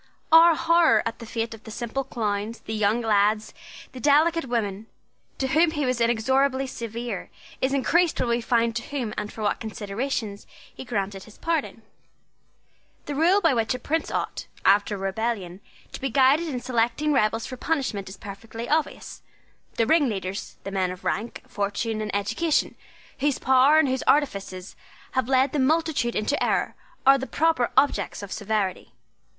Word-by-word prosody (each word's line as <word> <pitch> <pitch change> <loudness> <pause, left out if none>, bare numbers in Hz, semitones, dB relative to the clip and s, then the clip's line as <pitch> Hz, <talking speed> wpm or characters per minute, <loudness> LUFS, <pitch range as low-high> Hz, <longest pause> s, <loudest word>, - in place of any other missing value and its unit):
Our 330 +1 +8
horror 335 -8 +4
at 230 0 -4
the 230 - -9
fate 225 0 -3
of 225 0 -12
the - - -10
simple 235 +4 -3
clowns, 215 -3 -3
the 220 - -6
young 215 +2 +1
lads, 215 -1 +2 0.4
the 255 - -9
delicate 315 +5 +3
women, 220 -4 -2 0.5
to 265 - -1
whom 320 +5 +4
he 295 -3 -2
was 255 -2 0
inexorably 260 +4 +2
severe, 235 -4 -5 0.3
is 260 - +1
increased 330 +5 +2
when 240 - 0
we 235 0 +1
find 230 -1 +1
to 230 - -1
whom 250 -7 -4
and 210 0 -4
for 220 - -7
what 205 - 0
considerations 215 0 -4 0.3
he - - -8
granted 200 -4 -3
his 215 - -16
pardon. 320 -9 -2 1.2
The 290 - -4
rule 345 +8 +3
by 330 -6 +4
which 230 0 0
a - - -3
prince 315 +6 -2
ought, - - -3 0.2
after 205 +1 +4
a - - -6
rebellion, 195 -1 -3 0.3
to - - -8
be 270 - -1
guided 275 +5 +4
in 255 -5 -3
selecting 245 +4 0
rebels 225 -3 +1
for 255 - -6
punishment 255 -9 -2
is 190 - -10
perfectly 225 +4 -8
obvious. 310 +2 -2 0.5
The 230 - +2
ringleaders, 215 - 0
the 195 - -5
men 190 -2 0
of 180 +1 -8
rank, 225 +4 -3
fortune, 215 +2 -2
and 215 - -3
education, 225 +11 0 0.5
whose 285 0 +1
power 265 +3 +5
and 315 -2 +4
whose 260 0 -1
artifices 200 -10 0 0.4
have 260 -1 -1
led 265 0 +3
the 295 - 0
multitude 305 -3 +1
into 215 +7 0
error, - - 0 0.3
are 270 +1 +7
the 265 - -5
proper 320 -6 +1
objects 285 -6 +1
of 200 - -8
severity. 205 - -2
235 Hz, 170 wpm, -25 LUFS, 210-275 Hz, 1.2 s, Our